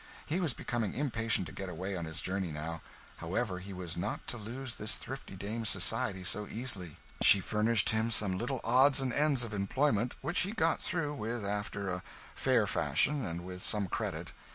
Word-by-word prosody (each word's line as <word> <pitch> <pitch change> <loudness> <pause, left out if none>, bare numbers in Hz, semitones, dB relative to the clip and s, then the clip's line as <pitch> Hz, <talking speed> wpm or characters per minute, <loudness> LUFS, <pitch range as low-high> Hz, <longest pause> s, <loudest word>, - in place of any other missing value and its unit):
He 160 +4 0
was 160 -9 0
becoming 115 -4 -2
impatient 115 -8 +1
to - - -9
get 95 -1 -5
away 95 +3 -3
on 85 -2 -3
his 80 0 -4
journey 95 -2 -1
now; 80 +2 -4 0.4
however, 90 +3 -2
he 95 +2 -8
was 90 -3 -4
not 85 - -3
to 120 - 0
lose 120 +3 -5
this 105 -2 0
thrifty 135 -6 -7
dame's 110 +3 -2
society 95 0 +1
so 105 +3 +1
easily. 100 -9 -3 0.2
She 100 - +8
furnished 105 +2 +2
him 110 +1 +1
some 105 -4 +3
little 120 +5 -2
odds 130 +4 +5
and 130 -2 0
ends 145 -3 +3
of 115 -2 -5
employment, 115 +3 +1
which 170 +6 0
he 195 +4 0
got 165 -7 +2
through 150 -4 -1
with 115 -4 -3
after 100 0 -2
a 90 0 -2 0.3
fair - - +3
fashion 100 - +3
and 85 -2 -4
with 90 0 -7
some 105 0 +2
credit. - - -3
105 Hz, 190 wpm, -32 LUFS, 95-125 Hz, 0.4 s, She